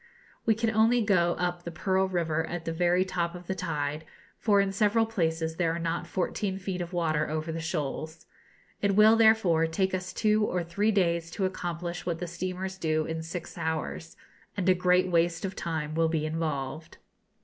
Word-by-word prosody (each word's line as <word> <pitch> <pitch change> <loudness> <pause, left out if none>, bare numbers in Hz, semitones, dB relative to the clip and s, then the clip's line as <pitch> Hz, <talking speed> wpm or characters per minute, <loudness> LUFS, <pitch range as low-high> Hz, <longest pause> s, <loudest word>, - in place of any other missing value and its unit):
We 220 - +5
can 225 0 0
only 225 +2 +4
go 175 -4 +3
up 175 0 -2
the 170 - -5
Pearl 190 +3 +1
River 165 -3 0
at 175 -2 -5
the 165 - -2
very 175 +2 +2
top 175 -2 -2
of 180 0 -9
the 190 - -2
tide, 150 -4 -3 0.4
for 205 -3 +3
in 195 -1 +2
several 210 +3 +3
places 165 -6 -1
there 165 -2 +1
are - - -3
not 170 +1 -2
fourteen 190 +2 -2
feet 185 -1 -4
of 175 0 -5
water 155 -4 0
over 155 +1 -2
the 165 - -4
shoals. 160 0 -4 0.6
It 200 -1 +2
will, 215 +2 +7
therefore, 220 -8 +4
take 190 +3 0
us 185 0 -3
two 215 -1 +2
or 180 -4 0
three 200 +6 0
days 170 -4 +1
to 195 - +1
accomplish 175 -1 -4
what 170 -2 -2
the 175 - -4
steamers 185 +2 -4
do 155 -2 0
in 160 0 -3
six 165 +1 -7
hours, 160 0 -3 0.4
and 185 -2 -1
a 185 - +7
great 180 0 +3
waste 170 +1 +2
of 190 0 -4
time 155 -2 -3
will 165 0 +2
be 160 -2 0
involved. 155 -1 -3
175 Hz, 195 wpm, -28 LUFS, 165-190 Hz, 0.6 s, will